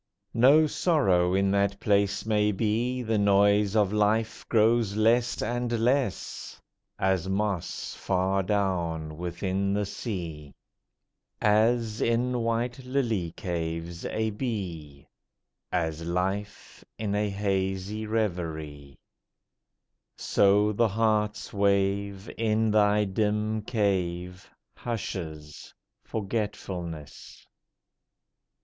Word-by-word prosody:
No 135 Hz, +7 st, +6 dB
sorrow 95 Hz, -, +2 dB
in 100 Hz, 0 st, +2 dB
that 100 Hz, 0 st, +1 dB
place 100 Hz, 0 st, +1 dB
may 105 Hz, -1 st, +2 dB
be, 115 Hz, +5 st, -1 dB
The 110 Hz, -2 st, 0 dB
noise 100 Hz, +1 st, +3 dB
of 105 Hz, -2 st, +3 dB
life 105 Hz, +1 st, +1 dB
grows 110 Hz, -2 st, +3 dB
less 115 Hz, +3 st, +2 dB
and 120 Hz, 0 st, -2 dB
less: 125 Hz, -4 st, -1 dB, 0.4 s
As 95 Hz, -1 st, 0 dB
moss 100 Hz, -3 st, -2 dB
far 95 Hz, +1 st, 0 dB
down 85 Hz, -6 st, -1 dB
within 95 Hz, +3 st, -1 dB
the 105 Hz, 0 st, 0 dB
sea, 85 Hz, -, -6 dB, 0.8 s
As, 110 Hz, +1 st, +2 dB
in 120 Hz, +2 st, +1 dB
white 115 Hz, +2 st, -1 dB
lily 115 Hz, -10 st, -1 dB
caves, 85 Hz, -2 st, -4 dB
a 110 Hz, 0 st, -1 dB
bee, 90 Hz, -, -5 dB, 0.6 s
As 80 Hz, -2 st, -1 dB
life 95 Hz, +4 st, -3 dB
in 105 Hz, -2 st, -2 dB
a 105 Hz, 0 st, 0 dB
hazy 100 Hz, +1 st, -2 dB
reverie; 80 Hz, -10 st, -3 dB, 1.2 s
So 105 Hz, +1 st, +3 dB
the 115 Hz, +2 st, +2 dB
heart's 105 Hz, 0 st, 0 dB
wave 100 Hz, 0 st, +1 dB
In 110 Hz, -1 st, +2 dB
thy 105 Hz, 0 st, +4 dB
dim 105 Hz, +2 st, 0 dB
cave, 90 Hz, -5 st, -2 dB, 0.3 s
Hushes, 80 Hz, -10 st, -6 dB, 0.3 s
Forgetfulness! 95 Hz, -7 st, -5 dB
100 Hz, 95 wpm, -27 LUFS, 95-110 Hz, 1.2 s, No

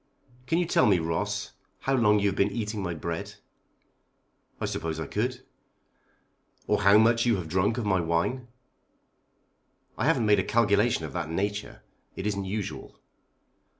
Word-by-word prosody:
"Can 165 Hz, -, +1 dB
you 175 Hz, -, +2 dB
tell 160 Hz, -, +3 dB
me, 100 Hz, -3 st, +5 dB
Ross, 80 Hz, 0 st, -2 dB, 0.3 s
how 135 Hz, -, 0 dB
long 105 Hz, -5 st, +4 dB
you 100 Hz, 0 st, +2 dB
have 95 Hz, -, -4 dB
been 100 Hz, +1 st, +2 dB
eating 105 Hz, 0 st, -3 dB
my 90 Hz, -3 st, -3 dB
bread?" 85 Hz, +1 st, -5 dB, 1.2 s
"I -, -, -2 dB
suppose 80 Hz, -1 st, -3 dB
I 80 Hz, -, -3 dB
could." 125 Hz, -, -3 dB, 1.2 s
"Or -, -, +1 dB
how 100 Hz, +1 st, +6 dB
much 115 Hz, +2 st, +4 dB
you 115 Hz, -, +4 dB
have 90 Hz, -4 st, -4 dB
drank 95 Hz, +7 st, +1 dB
of 120 Hz, -, -2 dB
my 95 Hz, -2 st, +2 dB
wine?" 85 Hz, +10 st, -1 dB, 1.5 s
"I -, -, +1 dB
haven't 115 Hz, -, +2 dB
made 105 Hz, -1 st, +4 dB
a -, -, +1 dB
calculation 105 Hz, -4 st, +2 dB
of 70 Hz, -, -8 dB
that 85 Hz, -3 st, -3 dB
nature. 100 Hz, +5 st, -3 dB, 0.3 s
It 95 Hz, -, -5 dB
isn't 100 Hz, -2 st, -1 dB
usual." 95 Hz, -9 st, -5 dB
100 Hz, 160 wpm, -27 LUFS, 85-115 Hz, 1.5 s, how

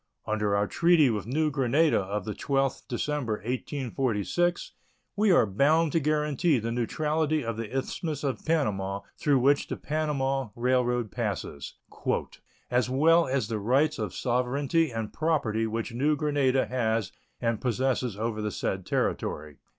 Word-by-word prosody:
Under 105 Hz, -1 st, 0 dB
our 100 Hz, 0 st, +2 dB
treaty 165 Hz, -1 st, +4 dB
with 105 Hz, -1 st, -3 dB
New 150 Hz, +4 st, +1 dB
Granada 140 Hz, +3 st, +2 dB
of 100 Hz, 0 st, -3 dB
the 105 Hz, -, -3 dB
12th 135 Hz, +3 st, -1 dB
December, 130 Hz, -1 st, -2 dB
1846, 130 Hz, -, -1 dB, 0.4 s
we 210 Hz, +1 st, +3 dB
are 175 Hz, -, +5 dB
bound 145 Hz, +10 st, +2 dB
to 165 Hz, -, +2 dB
guarantee 150 Hz, 0 st, +1 dB
the 115 Hz, 0 st, -2 dB
neutrality 150 Hz, +4 st, 0 dB
of 115 Hz, -1 st, -2 dB
the 115 Hz, -1 st, -5 dB
Isthmus 145 Hz, +4 st, -3 dB
of 135 Hz, -3 st, -2 dB
Panama, 100 Hz, -11 st, 0 dB, 0.2 s
through 145 Hz, -2 st, +3 dB
which 140 Hz, +3 st, +3 dB
the -, -, -4 dB
Panama 135 Hz, -4 st, -1 dB
Railroad 125 Hz, -2 st, +1 dB
passes, 70 Hz, -1 st, -4 dB, 1.0 s
"as 125 Hz, 0 st, +2 dB
well 165 Hz, +6 st, +4 dB
as 130 Hz, -4 st, 0 dB
the 110 Hz, -2 st, -2 dB
rights 135 Hz, +8 st, +2 dB
of 105 Hz, -5 st, -3 dB
sovereignty 135 Hz, +6 st, +1 dB
and 115 Hz, -2 st, -5 dB
property 125 Hz, -9 st, 0 dB
which 115 Hz, +2 st, -3 dB
New 145 Hz, +5 st, +2 dB
Granada 140 Hz, -3 st, +1 dB
has 115 Hz, -5 st, -1 dB, 0.3 s
and 115 Hz, -2 st, -1 dB
possesses 125 Hz, -2 st, 0 dB
over 110 Hz, 0 st, -2 dB
the 105 Hz, -, -1 dB
said 95 Hz, -2 st, -3 dB
territory." 75 Hz, -2 st, -2 dB
130 Hz, 145 wpm, -27 LUFS, 110-150 Hz, 1.0 s, are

